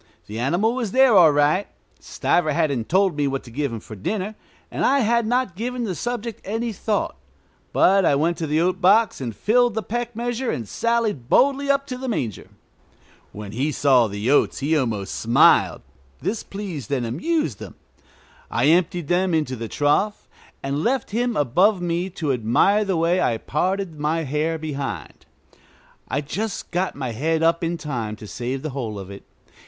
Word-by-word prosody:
The 110 Hz, +2 st, -6 dB
animal 175 Hz, -, +1 dB
was 240 Hz, -6 st, -3 dB
there 265 Hz, -3 st, +5 dB
all 170 Hz, -5 st, +7 dB
right. 145 Hz, +7 st, +2 dB, 0.3 s
Stiver 155 Hz, -4 st, 0 dB
hadn't 140 Hz, -8 st, 0 dB
told 190 Hz, -1 st, +3 dB
me 145 Hz, -1 st, 0 dB
what 135 Hz, 0 st, -3 dB
to 120 Hz, -, -13 dB
give 140 Hz, +2 st, -2 dB
him 115 Hz, -, -5 dB
for 110 Hz, -, -10 dB
dinner, 195 Hz, -, -3 dB, 0.4 s
and -, -, -2 dB
I 280 Hz, 0 st, +3 dB
had 235 Hz, 0 st, +2 dB
not 245 Hz, -5 st, 0 dB
given 245 Hz, +4 st, -3 dB
the 200 Hz, -5 st, -2 dB
subject 235 Hz, +2 st, -4 dB
any 225 Hz, +3 st, -3 dB
thought; 205 Hz, -, -2 dB, 0.6 s
but 195 Hz, +1 st, +4 dB
I 145 Hz, -, +3 dB
went 165 Hz, +4 st, +1 dB
to 160 Hz, -, -2 dB
the 150 Hz, +2 st, +1 dB
oat 185 Hz, +2 st, 0 dB
box 210 Hz, -1 st, +4 dB
and 115 Hz, -4 st, -4 dB
filled 240 Hz, -, +2 dB
the 220 Hz, -, -1 dB
peck 240 Hz, +4 st, -4 dB
measure 240 Hz, +1 st, -2 dB
and 115 Hz, -4 st, -3 dB
sallied 225 Hz, -, -1 dB
boldly 280 Hz, +1 st, +3 dB
up 275 Hz, 0 st, +2 dB
to 255 Hz, -3 st, -6 dB
the 260 Hz, -, -5 dB
manger. 120 Hz, -, -3 dB, 0.8 s
When 105 Hz, -1 st, -8 dB
he 135 Hz, +8 st, -1 dB
saw 130 Hz, -5 st, +4 dB
the 105 Hz, +5 st, -2 dB
oats 145 Hz, -, +3 dB
he 150 Hz, +4 st, 0 dB
almost 115 Hz, -9 st, -1 dB
smiled; 115 Hz, +2 st, +4 dB, 0.4 s
this 220 Hz, +1 st, -2 dB
pleased 185 Hz, -, -7 dB
and 130 Hz, -4 st, 0 dB
amused 150 Hz, -, -1 dB
him. -, -, -9 dB, 0.7 s
I 125 Hz, +5 st, +2 dB
emptied 175 Hz, -1 st, +2 dB
them 180 Hz, 0 st, +1 dB
into 150 Hz, -5 st, -1 dB
the 115 Hz, -1 st, -5 dB
trough, 150 Hz, -, 0 dB, 0.4 s
and 140 Hz, +3 st, -2 dB
left 255 Hz, -2 st, 0 dB
him 240 Hz, +2 st, 0 dB
above 180 Hz, -, +3 dB
me 175 Hz, +1 st, -1 dB
to 155 Hz, -6 st, -2 dB
admire 125 Hz, -, +3 dB
the 195 Hz, -4 st, -1 dB
way 170 Hz, +3 st, +2 dB
I 115 Hz, -9 st, +1 dB
parted 180 Hz, -, -2 dB
my 155 Hz, +2 st, 0 dB
hair 155 Hz, +3 st, -1 dB
behind. 145 Hz, -3 st, -6 dB, 0.8 s
I 140 Hz, -, -1 dB
just 200 Hz, +9 st, -4 dB
got 180 Hz, +1 st, -1 dB
my 130 Hz, -3 st, -4 dB
head 160 Hz, +8 st, 0 dB
up 165 Hz, +1 st, +2 dB
in 170 Hz, +1 st, -1 dB
time 120 Hz, -9 st, -4 dB
to 105 Hz, -, -11 dB
save 125 Hz, +4 st, -4 dB
the 155 Hz, -, -3 dB
whole 120 Hz, -6 st, -4 dB
of 95 Hz, 0 st, -8 dB
it. 100 Hz, -, -9 dB
165 Hz, 185 wpm, -22 LUFS, 135-215 Hz, 0.8 s, all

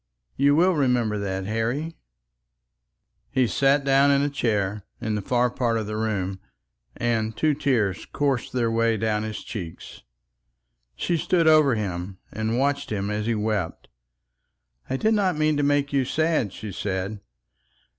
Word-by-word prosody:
You 140 Hz, +1 st, +4 dB
will 180 Hz, +4 st, +4 dB
remember 125 Hz, -8 st, +1 dB
that, 95 Hz, -1 st, -3 dB
Harry?" 120 Hz, +10 st, -2 dB, 1.3 s
He 130 Hz, -1 st, +2 dB
sat 140 Hz, +4 st, +3 dB
himself -, -, -13 dB
down 140 Hz, +1 st, +5 dB
in 140 Hz, 0 st, +3 dB
a 145 Hz, -, 0 dB
chair 105 Hz, -6 st, -1 dB, 0.2 s
in 110 Hz, -1 st, -2 dB
a 105 Hz, -, -2 dB
far 125 Hz, +3 st, +1 dB
part 120 Hz, -2 st, 0 dB
of 110 Hz, -, -2 dB
the 105 Hz, +1 st, -4 dB
room, 100 Hz, -4 st, -2 dB, 0.6 s
and 110 Hz, -2 st, -1 dB
two 155 Hz, +4 st, +2 dB
tears 115 Hz, -10 st, 0 dB
coursed 140 Hz, -4 st, -1 dB
their 120 Hz, -2 st, 0 dB
way 115 Hz, 0 st, +2 dB
down 110 Hz, -1 st, 0 dB
his 110 Hz, 0 st, -5 dB
cheeks. 90 Hz, -7 st, -8 dB, 0.9 s
She 170 Hz, -, 0 dB
stood 165 Hz, +1 st, +2 dB
over 155 Hz, -5 st, +6 dB
him 95 Hz, -3 st, -4 dB
and 110 Hz, +2 st, -1 dB
watched 140 Hz, 0 st, 0 dB
him 100 Hz, -1 st, -2 dB
as 105 Hz, +1 st, -2 dB
he 115 Hz, -, +1 dB
wept. 105 Hz, -5 st, -2 dB, 1.0 s
"I 130 Hz, -, 0 dB
did 220 Hz, +9 st, +2 dB
not 190 Hz, -6 st, +1 dB
mean 155 Hz, 0 st, +2 dB
to -, -, +1 dB
make 145 Hz, 0 st, +1 dB
you 135 Hz, -1 st, +3 dB
sad," 155 Hz, -, 0 dB
she 110 Hz, +1 st, -7 dB
said. 95 Hz, +2 st, -3 dB
115 Hz, 160 wpm, -24 LUFS, 105-140 Hz, 1.3 s, over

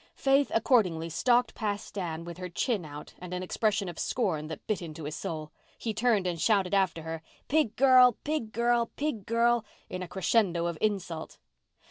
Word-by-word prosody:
Faith 275 Hz, +1 st, +3 dB
accordingly 190 Hz, -9 st, +2 dB
stalked 245 Hz, +6 st, +2 dB
past 205 Hz, -2 st, -3 dB
Dan 170 Hz, -4 st, -4 dB
with 170 Hz, 0 st, -8 dB
her 180 Hz, 0 st, -5 dB
chin 200 Hz, +1 st, -1 dB
out 150 Hz, 0 st, -9 dB
and 180 Hz, 0 st, -6 dB
an 180 Hz, -, -3 dB
expression 205 Hz, +1 st, 0 dB
of 175 Hz, -2 st, -7 dB
scorn 165 Hz, -11 st, -1 dB
that 160 Hz, -, -8 dB
bit 215 Hz, -4 st, -1 dB
into 160 Hz, -2 st, -7 dB
his 150 Hz, +1 st, -4 dB
soul. 155 Hz, -1 st, -5 dB, 0.3 s
He 225 Hz, -, -3 dB
turned 220 Hz, -4 st, +2 dB
and 175 Hz, -2 st, -2 dB
shouted 200 Hz, -4 st, +2 dB
after 190 Hz, -4 st, +1 dB
her. 160 Hz, 0 st, -5 dB, 0.3 s
"Pig 285 Hz, -7 st, +2 dB
girl! 255 Hz, -2 st, +6 dB
Pig 295 Hz, -8 st, -2 dB
girl!! 235 Hz, 0 st, +2 dB
Pig 275 Hz, -9 st, -3 dB
girl!!!" 235 Hz, 0 st, +3 dB, 0.3 s
in 185 Hz, -, -4 dB
a 180 Hz, -, -4 dB
crescendo 185 Hz, -2 st, +1 dB
of 170 Hz, -1 st, -1 dB
insult. 185 Hz, -6 st, -2 dB
200 Hz, 180 wpm, -29 LUFS, 170-235 Hz, 0.3 s, girl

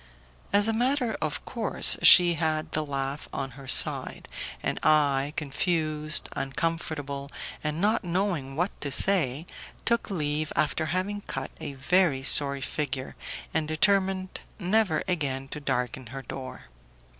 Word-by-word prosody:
As 205 Hz, +1 st, +3 dB
a 225 Hz, -, +1 dB
matter 245 Hz, 0 st, 0 dB
of 155 Hz, -1 st, -4 dB
course, 230 Hz, -3 st, +5 dB
she 175 Hz, -1 st, +8 dB
had 155 Hz, -1 st, -2 dB
the 155 Hz, -, -1 dB
laugh 140 Hz, 0 st, -5 dB
on 135 Hz, -, -5 dB
her 135 Hz, +1 st, -13 dB
side, -, -, +5 dB, 0.4 s
and -, -, -2 dB
I, 145 Hz, -2 st, +2 dB
confused, 155 Hz, 0 st, 0 dB
uncomfortable 140 Hz, -1 st, -4 dB, 0.3 s
and 150 Hz, +1 st, -3 dB
not 215 Hz, +4 st, +1 dB
knowing 175 Hz, -7 st, -2 dB
what 175 Hz, +6 st, -1 dB
to 140 Hz, -, -3 dB
say, 155 Hz, -4 st, +2 dB, 0.4 s
took 235 Hz, 0 st, 0 dB
leave 155 Hz, -4 st, -2 dB
after 155 Hz, +1 st, 0 dB
having 185 Hz, +6 st, -2 dB
cut -, -, -6 dB
a 140 Hz, -, -6 dB
very 140 Hz, 0 st, +1 dB
sorry 140 Hz, 0 st, +4 dB
figure, 135 Hz, -1 st, -4 dB, 0.4 s
and 155 Hz, -1 st, -1 dB
determined 190 Hz, +3 st, 0 dB, 0.2 s
never 190 Hz, -4 st, +1 dB
again 140 Hz, -7 st, -2 dB
to 150 Hz, -, -6 dB
darken 125 Hz, -2 st, -3 dB
her 135 Hz, +3 st, -8 dB
door. 130 Hz, -1 st, -8 dB
155 Hz, 135 wpm, -26 LUFS, 140-185 Hz, 0.4 s, she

